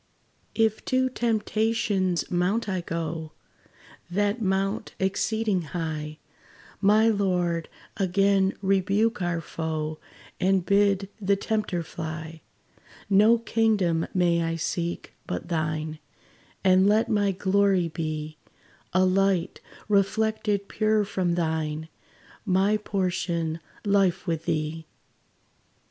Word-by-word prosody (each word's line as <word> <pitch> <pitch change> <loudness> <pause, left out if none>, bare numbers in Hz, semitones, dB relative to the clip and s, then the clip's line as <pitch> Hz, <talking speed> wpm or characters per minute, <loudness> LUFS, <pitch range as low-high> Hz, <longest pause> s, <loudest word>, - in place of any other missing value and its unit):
If 220 -1 +1
to 260 0 +2
Temptation's 215 -5 0
mount 185 +6 +1
I 185 -3 -1
go, 165 -2 -4 0.8
That 205 +5 0
mount 195 +1 -1
exceeding 200 +1 0 0.2
high, 155 -2 -4 0.6
My 215 +2 +5
Lord, 180 -6 0 0.3
again 195 0 +2
rebuke 195 +4 +2
our 175 -1 -1
foe, 155 -1 -4 0.4
And 190 -1 +2
bid 200 -1 +3
the 200 0 +3
tempter 195 -4 -2
fly. 160 0 -7 0.7
No 210 +4 +6
kingdom 215 -8 +1
may 175 -2 +2
I 165 0 -1
seek, 170 +1 -3
but - - -4
thine; 155 -1 -2 0.6
And 190 0 +5
let 215 +3 +3
my 205 -3 +2
glory 190 -1 +2
be 155 -1 -4 0.5
A 185 +1 +4
light, 190 -1 +1 0.3
reflected 210 0 +1
pure 215 -1 +1
from 180 -3 -1
thine 160 -2 -2 0.5
My 195 +1 +2
portion, 175 -5 -2 0.3
life 195 -4 +2
with 165 -3 -2
thee! 155 +1 -2
190 Hz, 100 wpm, -26 LUFS, 165-205 Hz, 0.8 s, No